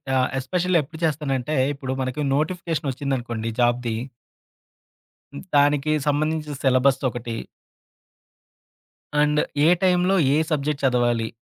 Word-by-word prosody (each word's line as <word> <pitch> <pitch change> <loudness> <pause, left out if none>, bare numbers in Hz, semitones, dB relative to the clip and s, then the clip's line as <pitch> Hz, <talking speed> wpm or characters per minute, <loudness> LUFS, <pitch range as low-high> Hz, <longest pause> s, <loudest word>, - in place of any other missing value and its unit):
ఆహ్, 130 -1 +3
ఎస్పెషల్లీ 175 +6 +1
ఎప్పుడు 160 +4 -12
చేస్తానంటే, 150 -2 -1 0.2
ఇప్పుడు 135 -2 -5
మనకి 130 +3 -3
నోటిఫికేషనొచ్చిందనుకోండి 140 -7 -2
జాబ్‌ది. 120 -1 +1 1.6
దానికి 145 +1 +3 0.2
సంబంధించిన 150 0 0
సిలబస్‌దొకటి. 130 -3 +1 1.9
అండ్ 150 0 +2 0.3
ఏ - - +6
టైంలో 180 +1 +3 0.2
ఏ - - +3
సబ్జెక్ట్ 150 -1 -1
చదవాలి. 120 -3 +2
140 Hz, 90 wpm, -23 LUFS, 125-155 Hz, 1.9 s, ఏ